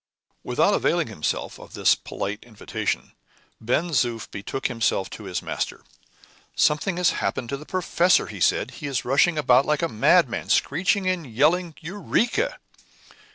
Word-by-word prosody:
Without -, -, +2 dB
availing -, -, +1 dB
himself -, -, -3 dB
of -, -, -12 dB
this -, -, +4 dB
polite 100 Hz, +2 st, -5 dB
invitation, 115 Hz, -4 st, -4 dB, 0.5 s
Ben 150 Hz, +10 st, 0 dB
Zoof 120 Hz, -6 st, 0 dB
betook 115 Hz, +7 st, -6 dB
himself 115 Hz, -6 st, 0 dB
to 105 Hz, -, -9 dB
his 90 Hz, -2 st, -4 dB
master. -, -, -4 dB, 0.7 s
"Something 155 Hz, +5 st, +2 dB
has 180 Hz, -1 st, +3 dB
happened 120 Hz, -, -2 dB
to 140 Hz, -, -2 dB
the 150 Hz, -, -12 dB
professor," 180 Hz, -1 st, +2 dB
he 105 Hz, -3 st, -8 dB
said; -, -, +2 dB
"he 145 Hz, -, -7 dB
is 130 Hz, -3 st, -2 dB
rushing 145 Hz, +6 st, +3 dB
about 130 Hz, -3 st, +4 dB
like 150 Hz, +1 st, +1 dB
a -, -, +2 dB
madman, 110 Hz, -7 st, +2 dB
screeching 185 Hz, +2 st, +1 dB
and 180 Hz, -5 st, -1 dB
yelling 160 Hz, +7 st, +2 dB
'Eureka! 225 Hz, -, -1 dB
145 Hz, 150 wpm, -24 LUFS, 120-175 Hz, 0.7 s, this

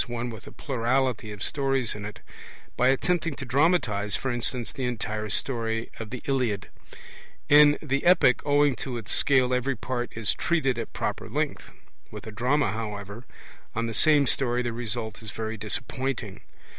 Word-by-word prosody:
one 120 Hz, 0 st, -3 dB
with 110 Hz, -1 st, -10 dB
a -, -, -9 dB
plurality 125 Hz, -3 st, -1 dB
of 105 Hz, -1 st, -6 dB
stories 135 Hz, -4 st, 0 dB
in 105 Hz, -1 st, -7 dB
it), 105 Hz, -, -8 dB, 0.5 s
by 125 Hz, -, +3 dB
attempting 165 Hz, +3 st, +1 dB
to 135 Hz, -, -6 dB
dramatize, 125 Hz, -, +2 dB
for 130 Hz, -, -2 dB
instance, 120 Hz, -2 st, -1 dB
the 135 Hz, -, -5 dB
entire 110 Hz, -3 st, -3 dB
story 115 Hz, -1 st, -1 dB
of 115 Hz, -2 st, -6 dB
the 125 Hz, +1 st, -7 dB
Iliad. 125 Hz, -8 st, -1 dB, 0.8 s
In 145 Hz, 0 st, +7 dB
the 140 Hz, -2 st, -1 dB
epic 175 Hz, -8 st, +5 dB
owing 145 Hz, -1 st, +3 dB
to 125 Hz, 0 st, -4 dB
its 110 Hz, -3 st, -5 dB
scale 130 Hz, -4 st, +3 dB
every 130 Hz, +2 st, 0 dB
part 120 Hz, +1 st, -3 dB
is 115 Hz, -2 st, +2 dB
treated 135 Hz, -8 st, 0 dB
at 115 Hz, -, -5 dB
proper -, -, -3 dB
length; -, -, -2 dB, 0.4 s
with -, -, -9 dB
a 110 Hz, -, -7 dB
drama, 125 Hz, +7 st, +1 dB
however, 105 Hz, 0 st, -6 dB, 0.5 s
on 115 Hz, +1 st, 0 dB
the 115 Hz, -, -3 dB
same 150 Hz, +4 st, +5 dB
story 125 Hz, -2 st, +1 dB
the 120 Hz, -1 st, -2 dB
result 115 Hz, -2 st, -4 dB
is 110 Hz, -, -7 dB
very 110 Hz, 0 st, -4 dB
disappointing. 115 Hz, 0 st, -3 dB
120 Hz, 170 wpm, -26 LUFS, 110-135 Hz, 0.8 s, In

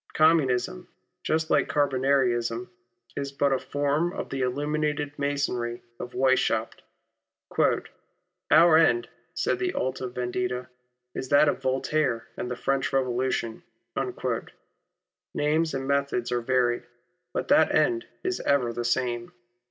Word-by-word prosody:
Communism, 135 Hz, -, +2 dB, 0.3 s
just 160 Hz, 0 st, 0 dB
like 145 Hz, -, +3 dB
Carbonarism, 135 Hz, 0 st, +1 dB, 0.4 s
is 140 Hz, -1 st, -3 dB
but 140 Hz, 0 st, +1 dB
a 130 Hz, -, +1 dB
form 145 Hz, +6 st, 0 dB
of -, -, -5 dB
the 135 Hz, -, -2 dB
illuminated 145 Hz, +2 st, -1 dB
Masonry 135 Hz, -4 st, -1 dB, 0.2 s
of 125 Hz, -, -7 dB
Weishaupt. 130 Hz, 0 st, +1 dB, 0.9 s
" 180 Hz, 0 st, -7 dB
Our 160 Hz, +1 st, +7 dB
end," 120 Hz, -8 st, +3 dB, 0.3 s
said -, -, 0 dB
the 370 Hz, -1 st, -1 dB
Alta 130 Hz, 0 st, -2 dB
Vendita, 125 Hz, +1 st, -3 dB, 0.4 s
"is 130 Hz, -, -5 dB
that 145 Hz, +2 st, +6 dB
of -, -, 0 dB
Voltaire 130 Hz, -2 st, 0 dB
and 125 Hz, -, -4 dB
the 125 Hz, -, -3 dB
French 135 Hz, 0 st, 0 dB
Revolution." 125 Hz, -3 st, -1 dB, 1.7 s
Names 155 Hz, +2 st, +1 dB
and 135 Hz, 0 st, -3 dB
methods 140 Hz, -4 st, 0 dB
are 120 Hz, 0 st, 0 dB
varied, 120 Hz, -1 st, +1 dB, 0.5 s
but -, -, -3 dB
that -, -, +5 dB
end 350 Hz, 0 st, +2 dB, 0.2 s
is 370 Hz, 0 st, -1 dB
ever 125 Hz, -5 st, +1 dB
the 120 Hz, -, -3 dB
same. 120 Hz, -1 st, -1 dB
135 Hz, 125 wpm, -26 LUFS, 125-150 Hz, 1.7 s, Our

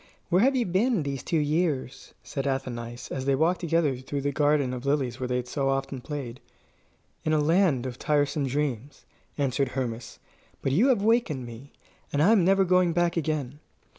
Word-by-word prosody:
"Where 180 Hz, +3 st, +4 dB
have 270 Hz, +3 st, +4 dB
you 245 Hz, -2 st, +1 dB
been, 195 Hz, -, +1 dB
these 140 Hz, -2 st, -3 dB
two 165 Hz, -, -1 dB
years?" 150 Hz, -4 st, -1 dB
said 140 Hz, 0 st, -4 dB
Athenais, 120 Hz, -3 st, -4 dB
as 130 Hz, -1 st, -3 dB
they 135 Hz, 0 st, +3 dB
walked 165 Hz, +6 st, +2 dB
together 165 Hz, -5 st, +1 dB
through 135 Hz, +2 st, -4 dB
the 145 Hz, +1 st, -1 dB
garden 145 Hz, -2 st, +2 dB
of 125 Hz, -1 st, -6 dB
lilies 140 Hz, -3 st, 0 dB
where 130 Hz, -, -2 dB
they 125 Hz, -, -1 dB
had 125 Hz, 0 st, -2 dB
so 135 Hz, +1 st, -1 dB
often 135 Hz, -1 st, -2 dB
played. 130 Hz, -4 st, -6 dB, 0.8 s
"In 155 Hz, -, 0 dB
a 155 Hz, -, +3 dB
land 155 Hz, -4 st, +2 dB
of 125 Hz, -1 st, -6 dB
tiresome 145 Hz, -1 st, +1 dB
dreams," 140 Hz, -1 st, -3 dB, 0.3 s
answered 135 Hz, -1 st, 0 dB
Hermas; 115 Hz, -3 st, -4 dB, 0.5 s
"but 135 Hz, -, 0 dB
you 195 Hz, -, +4 dB
have 240 Hz, -7 st, +2 dB
wakened 215 Hz, -, +1 dB
me, 120 Hz, +4 st, -11 dB, 0.4 s
and 145 Hz, +1 st, +2 dB
I 200 Hz, -, +5 dB
am 210 Hz, -5 st, +5 dB
never 195 Hz, +2 st, +4 dB
going 180 Hz, -1 st, +3 dB
back 175 Hz, 0 st, +1 dB
again." 150 Hz, -4 st, -2 dB
145 Hz, 190 wpm, -26 LUFS, 130-170 Hz, 0.8 s, I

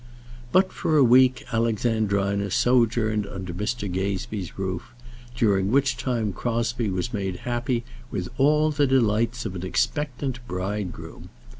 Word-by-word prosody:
But 185 Hz, +1 st, +4 dB
for 155 Hz, -, +1 dB
a 140 Hz, -, +6 dB
week 130 Hz, +1 st, +5 dB
Alexandrina 105 Hz, -3 st, +1 dB
sojourned 110 Hz, -2 st, +2 dB
under 95 Hz, -3 st, -6 dB
Mr. 105 Hz, +4 st, -2 dB
Gazebee's 95 Hz, 0 st, -3 dB
roof, 95 Hz, +5 st, -4 dB, 0.4 s
during 100 Hz, -5 st, +2 dB
which 135 Hz, +3 st, +2 dB
time 115 Hz, -6 st, -1 dB
Crosbie 115 Hz, +1 st, -1 dB
was 95 Hz, +6 st, -2 dB
made 95 Hz, -3 st, -2 dB
happy 120 Hz, 0 st, -1 dB, 0.3 s
with 90 Hz, -5 st, -3 dB
all 150 Hz, +3 st, +4 dB
the 145 Hz, -1 st, +2 dB
delights 115 Hz, -2 st, +1 dB
of 100 Hz, -, -3 dB
an 90 Hz, -1 st, -6 dB
expectant 125 Hz, +5 st, -1 dB
bridegroom. 95 Hz, -2 st, -5 dB
115 Hz, 130 wpm, -25 LUFS, 100-125 Hz, 0.4 s, a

